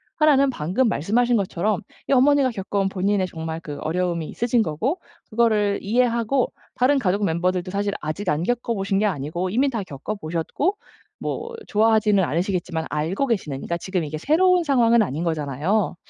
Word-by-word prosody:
1 305 Hz, -2 st, +5 dB
는 275 Hz, 0 st, +4 dB
방금 195 Hz, +5 st, 0 dB
말씀하신 235 Hz, +9 st, +1 dB
것처럼 200 Hz, +1 st, -1 dB, 0.3 s
이 -, -, +2 dB
어머니가 270 Hz, 0 st, +4 dB
겪어온 195 Hz, -2 st, -1 dB
본인의 190 Hz, 0 st, 0 dB
정말 160 Hz, -1 st, -5 dB
그 145 Hz, -2 st, -7 dB
어려움이 170 Hz, -1 st, -1 dB
있으신 240 Hz, 0 st, +1 dB
거고 225 Hz, -, -2 dB, 0.3 s
그거를 215 Hz, -3 st, +2 dB
이해하고 235 Hz, +3 st, +1 dB, 0.2 s
다른 265 Hz, +3 st, +3 dB
가족 200 Hz, -1 st, +1 dB
멤버들도 180 Hz, +1 st, 0 dB
사실 200 Hz, 0 st, -1 dB
아직 165 Hz, +6 st, -3 dB
안 155 Hz, 0 st, 0 dB
겪어보신 205 Hz, -4 st, -1 dB
게 215 Hz, -, +2 dB
아니고 175 Hz, +1 st, -2 dB
이미 260 Hz, +7 st, +2 dB
다 230 Hz, -5 st, -3 dB
겪어보셨고 175 Hz, -, -3 dB, 0.4 s
뭐 465 Hz, +1 st, -4 dB
좋아하지는 215 Hz, -2 st, +3 dB
않으시겠지만 170 Hz, -1 st, -1 dB
알고 165 Hz, -, -1 dB
계시는 185 Hz, -, -1 dB
그러니까 170 Hz, -, -3 dB
지금 185 Hz, -1 st, -2 dB
이게 155 Hz, +1 st, -5 dB
새로운 355 Hz, -, +3 dB
상황은 235 Hz, -6 st, +4 dB
아닌 165 Hz, -5 st, -1 dB
거잖아요. 160 Hz, +6 st, 0 dB
200 Hz, 395 characters per minute, -23 LUFS, 170-240 Hz, 0.4 s, 1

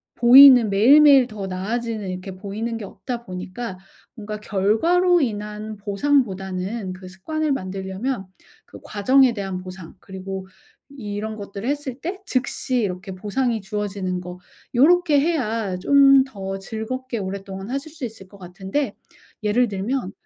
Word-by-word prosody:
보이는 250 Hz, -1 st, +8 dB
매일매일 270 Hz, +5 st, +6 dB
더 210 Hz, -3 st, -6 dB
나아지는 210 Hz, +2 st, -3 dB
이렇게 185 Hz, +1 st, -6 dB
보이는 210 Hz, +4 st, -5 dB
게 220 Hz, -, -7 dB
없다 240 Hz, +4 st, -6 dB
보니까 185 Hz, +2 st, -6 dB, 0.4 s
뭔가 210 Hz, -1 st, -6 dB
결과로 325 Hz, -, +2 dB
인한 210 Hz, -2 st, -4 dB
보상보다는 200 Hz, -3 st, -1 dB
그 185 Hz, 0 st, -11 dB
습관을 305 Hz, +12 st, -3 dB
만들려면 195 Hz, +1 st, -3 dB, 0.4 s
그 -, -, -13 dB
과정에 255 Hz, +4 st, +3 dB
대한 195 Hz, -3 st, -4 dB
보상 185 Hz, -2 st, -10 dB
그리고 190 Hz, 0 st, -7 dB, 0.4 s
이런 215 Hz, -5 st, -5 dB
것들을 200 Hz, +2 st, -6 dB
했을 280 Hz, -3 st, -3 dB
때 370 Hz, +4 st, -4 dB
즉시 255 Hz, -1 st, -1 dB
이렇게 190 Hz, -1 st, -4 dB
보상이 220 Hz, +4 st, -2 dB
주어지는 195 Hz, -2 st, -3 dB
거 180 Hz, 0 st, -9 dB, 0.3 s
요렇게 310 Hz, +3 st, +4 dB
해야 230 Hz, -, -1 dB
좀 275 Hz, +6 st, +6 dB
더 195 Hz, -6 st, -6 dB
즐겁게 230 Hz, +4 st, -5 dB
오랫동안 195 Hz, +1 st, -6 dB
하실 275 Hz, +4 st, -4 dB
수 315 Hz, -2 st, -12 dB
있을 220 Hz, -4 st, -10 dB
것 200 Hz, -, -16 dB
같은데 190 Hz, +7 st, -4 dB, 0.5 s
예를 240 Hz, +4 st, +2 dB
들면 200 Hz, +2 st, -3 dB
210 Hz, 305 characters per minute, -22 LUFS, 190-260 Hz, 0.5 s, 보이는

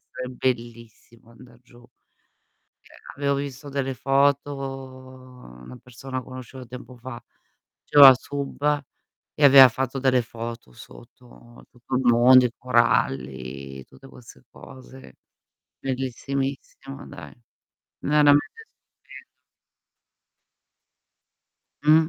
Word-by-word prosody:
essere 125 Hz, -, -9 dB
bellissimo 115 Hz, -2 st, -6 dB
andar 120 Hz, 0 st, -18 dB
giù. 120 Hz, -1 st, -20 dB, 1.0 s
Cioè, -, -, -22 dB, 0.2 s
avevo 140 Hz, 0 st, -1 dB
visto 140 Hz, 0 st, -7 dB
delle 135 Hz, -1 st, -3 dB
foto 140 Hz, +2 st, +1 dB
una 130 Hz, -, -11 dB
persona 130 Hz, +1 st, -8 dB
conoscevo 130 Hz, 0 st, -11 dB
tempo 125 Hz, +1 st, -11 dB
fa, 120 Hz, 0 st, -10 dB, 0.6 s
faceva 140 Hz, -2 st, +8 dB
sub 145 Hz, +2 st, -3 dB, 0.5 s
e 145 Hz, -, +3 dB
aveva 135 Hz, -2 st, +9 dB
fatto 135 Hz, +2 st, -4 dB
delle 130 Hz, -2 st, +2 dB
foto 115 Hz, -, -9 dB
sotto, -, -, -17 dB
tutto 125 Hz, +1 st, -7 dB
il 130 Hz, -, 0 dB
mondo, 125 Hz, +1 st, +6 dB
i 115 Hz, -, -3 dB
coralli, 70 Hz, -, -1 dB
tutte 135 Hz, 0 st, -18 dB
queste 115 Hz, -, -16 dB
cose. 130 Hz, -, -15 dB, 0.6 s
Bellissimissimo, 135 Hz, +1 st, -5 dB
dai, -, -, -12 dB, 0.7 s
veramente 150 Hz, -, +2 dB
stupendo. 465 Hz, -, -19 dB, 2.4 s
Mh. 155 Hz, +1 st, +4 dB
130 Hz, 95 wpm, -23 LUFS, 120-135 Hz, 2.4 s, aveva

